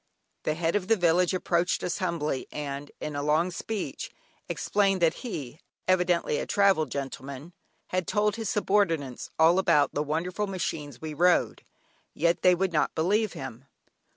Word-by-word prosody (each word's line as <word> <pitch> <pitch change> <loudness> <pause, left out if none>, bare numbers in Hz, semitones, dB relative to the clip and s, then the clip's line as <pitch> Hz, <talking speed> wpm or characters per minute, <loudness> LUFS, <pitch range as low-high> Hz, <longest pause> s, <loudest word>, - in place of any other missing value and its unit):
The 155 - +1
Head 165 +2 0
of 195 -3 0
the 225 - +5
village 175 -1 +3
approached 180 -1 0
us 175 - -2
humbly, 165 -7 -2
and 145 -1 -5
in 150 - -5
a 145 - -1
long 155 +5 +2
speech 210 +3 -4 0.4
explained 195 -2 +1
that 165 - +4
though - - -12
he 145 - -6 0.3
(evidently 180 -4 +2
a - - -4
travelled 195 -7 +3
gentleman) 140 +3 -6 0.4
had 185 -2 -1
told 210 0 +1
his 225 -3 -3
subordinates 165 - 0
all 165 +3 +5
about 150 -7 +3
the 145 - 0
wonderful 170 +7 -2
machines 150 -8 -4
we 155 +2 -5
rode, 175 +3 +2 0.5
yet 170 +2 +1
they 180 -1 +6
would 185 0 -1
not 150 - +1
believe 205 +6 +1
him. 130 -1 -8
170 Hz, 160 wpm, -27 LUFS, 150-185 Hz, 0.5 s, they